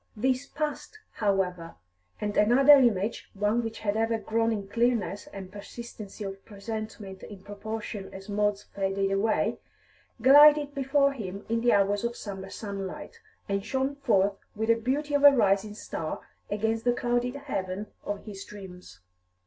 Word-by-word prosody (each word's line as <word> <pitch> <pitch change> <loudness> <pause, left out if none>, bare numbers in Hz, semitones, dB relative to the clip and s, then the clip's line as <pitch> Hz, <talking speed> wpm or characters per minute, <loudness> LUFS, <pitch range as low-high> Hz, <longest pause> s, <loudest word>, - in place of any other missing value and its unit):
This 255 +4 0
passed, 305 +7 -4
however, 185 -5 -1 0.4
and 210 -1 -2
another 255 +7 +7
image, 230 -6 +3
one 210 +4 +1
which 225 -1 -5
had 205 -1 0
ever 225 +1 +1
grown 225 +1 0
in 205 -3 -3
clearness 225 -4 0
and 190 -2 -8
persistency 210 0 -9
of 195 0 -7
presentment 215 -2 -7
in 200 -3 -11
proportion 205 0 -6
as 195 +1 -10
Maud's 205 -1 0
faded 195 0 -1
away, 200 +3 +1 0.6
glided 290 +3 +7
before 275 +1 +2
him 200 -6 -6
in 230 0 +1
the 240 0 +4
hours 200 +1 +2
of 235 0 -2
summer 195 -3 -7
sunlight, 195 -3 -6 0.3
and 200 0 -1
shone 265 +5 -1
forth 200 -7 +2 0.2
with 220 +2 -2
the - - +8
beauty 275 +6 -2
of 285 0 +2
a 285 - +12
rising 210 -5 +2
star 160 -6 -5 0.3
against 220 +2 -1
the 245 - +3
clouded 245 +1 0
heaven 200 -8 -4 0.2
of 205 -1 -5
his 200 -3 -7
dreams. 180 - -12
215 Hz, 150 wpm, -28 LUFS, 195-240 Hz, 0.6 s, a